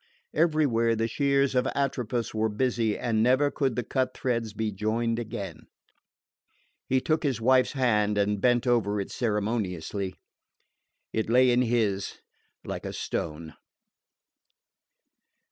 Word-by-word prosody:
Everywhere 145 Hz, -8 st, +2 dB
the 115 Hz, +1 st, 0 dB
shears 140 Hz, +2 st, +1 dB
of 125 Hz, 0 st, +2 dB
Atropos 125 Hz, -4 st, -1 dB
were 110 Hz, 0 st, +1 dB
busy, 115 Hz, 0 st, 0 dB
and 110 Hz, -2 st, 0 dB
never 130 Hz, +5 st, +3 dB
could 135 Hz, -3 st, 0 dB
the 125 Hz, -, -1 dB
cut 130 Hz, +3 st, -1 dB
threads 115 Hz, -4 st, -1 dB
be 110 Hz, +1 st, -2 dB
joined 115 Hz, +3 st, -1 dB
again. 100 Hz, -8 st, -6 dB, 1.2 s
He 130 Hz, -, +2 dB
took 155 Hz, +4 st, 0 dB
his 135 Hz, -6 st, -1 dB
wife's 130 Hz, +2 st, +3 dB
hand 105 Hz, -6 st, +2 dB
and 100 Hz, 0 st, +1 dB
bent 120 Hz, -1 st, +3 dB
over 110 Hz, -4 st, +1 dB
it 100 Hz, -, -4 dB
ceremoniously. 100 Hz, -4 st, -2 dB, 1.0 s
It 110 Hz, 0 st, -1 dB
lay 125 Hz, +1 st, +5 dB
in 120 Hz, +1 st, +3 dB
his 110 Hz, -5 st, 0 dB, 0.5 s
like -, -, -5 dB
a -, -, -5 dB
stone. 80 Hz, 0 st, -4 dB
115 Hz, 130 wpm, -27 LUFS, 105-130 Hz, 1.2 s, lay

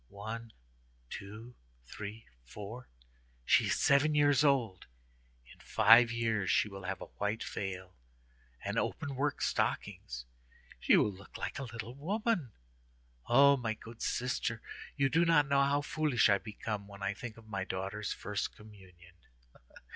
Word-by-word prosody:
"One, 110 Hz, +3 st, -7 dB, 0.6 s
two, 105 Hz, +5 st, -8 dB, 0.3 s
three, 105 Hz, -, -8 dB, 0.2 s
four—she -, -, -3 dB
is -, -, +1 dB
seven 145 Hz, +2 st, +4 dB
years 145 Hz, -1 st, +4 dB
old. 125 Hz, -10 st, +1 dB, 0.7 s
In -, -, -22 dB
five 115 Hz, +2 st, +6 dB
years 115 Hz, -4 st, 0 dB
she 105 Hz, -, +3 dB
will 100 Hz, -2 st, -9 dB
have 95 Hz, +1 st, -4 dB
a -, -, -5 dB
white 105 Hz, +2 st, -1 dB
veil, 95 Hz, -2 st, -5 dB, 0.7 s
and -, -, 0 dB
openwork 140 Hz, +1 st, -2 dB
stockings; -, -, -2 dB, 0.5 s
she -, -, +5 dB
will 105 Hz, -, +3 dB
look 95 Hz, +1 st, -12 dB
like -, -, -4 dB
a -, -, -3 dB
little 115 Hz, +1 st, -6 dB
woman. 180 Hz, -, -1 dB, 0.8 s
O 140 Hz, +3 st, +7 dB
my 110 Hz, -3 st, -2 dB
good 115 Hz, +1 st, -12 dB
sister, 120 Hz, -2 st, -1 dB, 0.4 s
you 140 Hz, -1 st, +3 dB
do 165 Hz, +5 st, +3 dB
not 165 Hz, -4 st, +4 dB
know 140 Hz, 0 st, +3 dB
how 140 Hz, +1 st, +2 dB
foolish 145 Hz, -6 st, +2 dB
I 100 Hz, -1 st, +4 dB
become 105 Hz, -1 st, -5 dB
when 100 Hz, -1 st, -10 dB
I 100 Hz, 0 st, 0 dB
think 115 Hz, +2 st, -8 dB
of 115 Hz, -, -14 dB
my 100 Hz, -3 st, -3 dB
daughter's 95 Hz, +3 st, -4 dB
first 105 Hz, -1 st, -3 dB
communion!" 95 Hz, -5 st, -16 dB
110 Hz, 140 wpm, -32 LUFS, 100-135 Hz, 0.8 s, O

